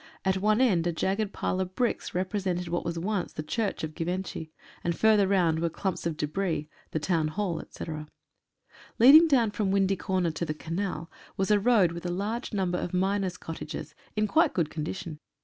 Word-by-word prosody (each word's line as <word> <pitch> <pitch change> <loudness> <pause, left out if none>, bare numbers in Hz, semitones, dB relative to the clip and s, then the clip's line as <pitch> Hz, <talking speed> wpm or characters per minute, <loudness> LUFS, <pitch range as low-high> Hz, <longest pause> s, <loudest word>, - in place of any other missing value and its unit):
At 190 0 +2
one 215 +4 +2
end 180 -10 +3
a - - +2
jagged 195 +5 -1
pile 185 - -2
of 185 0 -3
bricks 245 -7 -1
represented 185 -1 -1
what 175 +1 -1
was 170 0 -3
once 190 +2 -2
the 155 - -4
Church 205 +6 -2
of 155 0 -4
Givenchy, 175 -1 -4 0.3
and 170 -1 -1
further 215 -3 +5
round 175 -5 +2
were 170 0 +1
clumps 185 0 -2
of 160 -2 -3
debris 155 0 -1
— - - -30
the - - -2
Town 160 0 +1
Hall, 175 +1 -2
etc. 155 -2 -7 0.9
Leading 295 +8 +9
down 245 -8 +3
from 205 -1 -1
Windy 195 0 +2
Corner 185 -2 0
to 155 - -4
the 155 -2 -2
Canal 170 0 -4 0.3
was 195 +2 +1
a 210 - +5
road 205 -5 +4
with 170 +1 -5
a - - -1
large 210 +7 -3
number 185 -4 0
of 180 - -3
miners' 190 -1 0
cottages, 155 -1 -7 0.2
in 215 0 +2
quite 320 +9 +3
good 165 -4 0
condition. 155 0 -5
185 Hz, 195 wpm, -28 LUFS, 165-205 Hz, 0.9 s, Leading